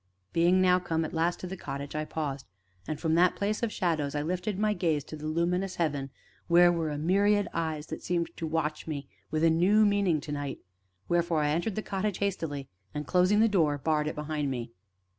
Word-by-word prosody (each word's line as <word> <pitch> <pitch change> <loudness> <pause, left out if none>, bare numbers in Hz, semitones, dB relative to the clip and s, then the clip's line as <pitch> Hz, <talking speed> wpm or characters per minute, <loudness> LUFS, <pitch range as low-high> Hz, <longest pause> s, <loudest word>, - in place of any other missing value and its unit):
Being 175 +2 +4 0.2
come 165 -2 -1
at - - -6
last 170 +1 0
to - - -4
the 185 +1 -5
cottage, 140 -5 -6
I 155 0 -1
paused, 145 -4 -4 0.4
and 155 - -3
from 160 0 0
that 175 +2 +4
place 210 +1 -1
of 235 -2 0
shadows 155 -7 -1
lifted 180 +6 -2
my 210 +1 +2
gaze 160 -7 0
to 155 - -8
the 155 0 -6
luminous 180 +4 0
heaven, 145 -5 -1 0.4
where 175 0 +6
were 165 -2 -1
a 145 - -3
myriad 200 +6 +3
eyes 160 -2 -2
that - - -5
seemed 170 -1 -1
to 165 - -3
watch 155 -1 -2
me 145 -3 -4 0.2
with 155 0 -1
a 165 - +6
new 195 +6 +4
meaning, 200 -6 +2
to 145 - -7
night; 145 -2 -3 0.5
wherefore 170 -2 +1
I 150 - +2
entered 175 +6 -1
the 215 - -2
cottage 195 0 -2
hastily, 165 -9 -2 0.3
and, 150 0 -3
closing 185 +6 +3
the 225 - +6
door, 160 -9 +2
barred 150 +1 0
it - - -3
behind 150 -1 -2
me. 120 -3 -4
165 Hz, 205 wpm, -29 LUFS, 150-185 Hz, 0.5 s, where